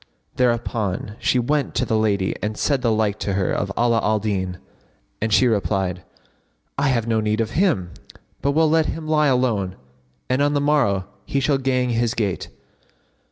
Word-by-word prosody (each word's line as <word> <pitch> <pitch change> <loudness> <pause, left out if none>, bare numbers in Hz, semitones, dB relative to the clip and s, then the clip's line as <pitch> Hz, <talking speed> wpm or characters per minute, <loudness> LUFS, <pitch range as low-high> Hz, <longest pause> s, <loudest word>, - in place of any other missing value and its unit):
Thereupon 115 -5 -1
she - - +1
went 140 +4 0
to 125 - +1
the 110 - 0
lady 100 -3 +1
and 105 0 -3
said 140 -3 +1
the 115 -2 +2
like 110 -1 0
to 100 - -2
her 95 -1 0
of 100 0 -1
Ala 120 -1 +3
al 110 -1 +1
Din, 95 -4 -2 0.6
and 110 +1 -1
she 130 - +5
replied, 95 -5 0 0.7
"I 140 +1 +1
have 120 -4 +1
no 115 -1 +1
need 110 0 0
of 110 -1 -1
him, 145 - +1 0.5
but 140 +2 +1
will 160 +1 +4
let 160 0 +3
him 155 0 -5
lie 155 -1 +3
alone, 115 -8 +1 0.5
and 130 +2 +1
on 145 0 +2
the - - +3
morrow 135 -10 +2 0.2
he 140 - -1
shall 140 0 +1
gang 130 -2 0
his 115 0 0
gait." 100 -5 -2
115 Hz, 180 wpm, -22 LUFS, 105-135 Hz, 0.7 s, she